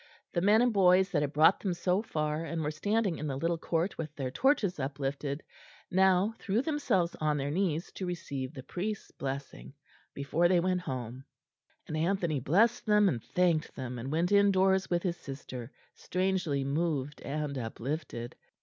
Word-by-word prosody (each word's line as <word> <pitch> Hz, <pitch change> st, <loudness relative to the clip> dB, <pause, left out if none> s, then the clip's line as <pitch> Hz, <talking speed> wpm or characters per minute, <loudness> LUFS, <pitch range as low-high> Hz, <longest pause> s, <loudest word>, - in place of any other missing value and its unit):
The 170 Hz, -, +1 dB
men 210 Hz, +5 st, +5 dB
and 245 Hz, -2 st, +2 dB
boys 190 Hz, -1 st, +5 dB
that 150 Hz, -, +2 dB
had 145 Hz, -2 st, -1 dB
brought 155 Hz, +5 st, +5 dB
them 185 Hz, -4 st, -2 dB
so 180 Hz, +3 st, +1 dB
far, 155 Hz, -6 st, -2 dB
and 165 Hz, -1 st, -3 dB
were 150 Hz, -, -1 dB
standing 205 Hz, +3 st, 0 dB
in 150 Hz, -, -3 dB
the 135 Hz, -, -2 dB
little 165 Hz, +3 st, 0 dB
court 170 Hz, +3 st, -1 dB
with 155 Hz, -2 st, -5 dB
their 130 Hz, -3 st, -3 dB
torches 210 Hz, -, +2 dB
uplifted, 140 Hz, +1 st, -3 dB, 0.5 s
now 190 Hz, +3 st, +4 dB
threw 215 Hz, +5 st, 0 dB
themselves 250 Hz, -, +1 dB
on 150 Hz, -1 st, +1 dB
their 140 Hz, 0 st, -2 dB
knees 170 Hz, -1 st, -1 dB
to 185 Hz, -, -5 dB
receive 140 Hz, -7 st, -4 dB
the 130 Hz, -, -7 dB
priest's 200 Hz, +9 st, -4 dB
blessing, 135 Hz, -, -6 dB, 0.4 s
before 150 Hz, +5 st, +2 dB
they 180 Hz, 0 st, +4 dB
went 180 Hz, +1 st, +1 dB
home; 130 Hz, -5 st, -5 dB, 0.6 s
and 155 Hz, -, -4 dB
Anthony 170 Hz, -2 st, 0 dB
blessed 215 Hz, -, +2 dB
them 210 Hz, -1 st, +5 dB
and 120 Hz, -7 st, -3 dB
thanked 175 Hz, -4 st, +1 dB
them, 125 Hz, -2 st, -5 dB
and 130 Hz, +4 st, -5 dB
went 170 Hz, +4 st, +1 dB
indoors 190 Hz, -1 st, +4 dB
with 175 Hz, -1 st, 0 dB
his 175 Hz, -2 st, -1 dB
sister, 130 Hz, -3 st, -8 dB, 0.2 s
strangely 180 Hz, -6 st, -1 dB
moved 145 Hz, -1 st, -1 dB
and 145 Hz, 0 st, -3 dB
uplifted. 120 Hz, +1 st, -5 dB
165 Hz, 170 wpm, -30 LUFS, 140-190 Hz, 0.6 s, men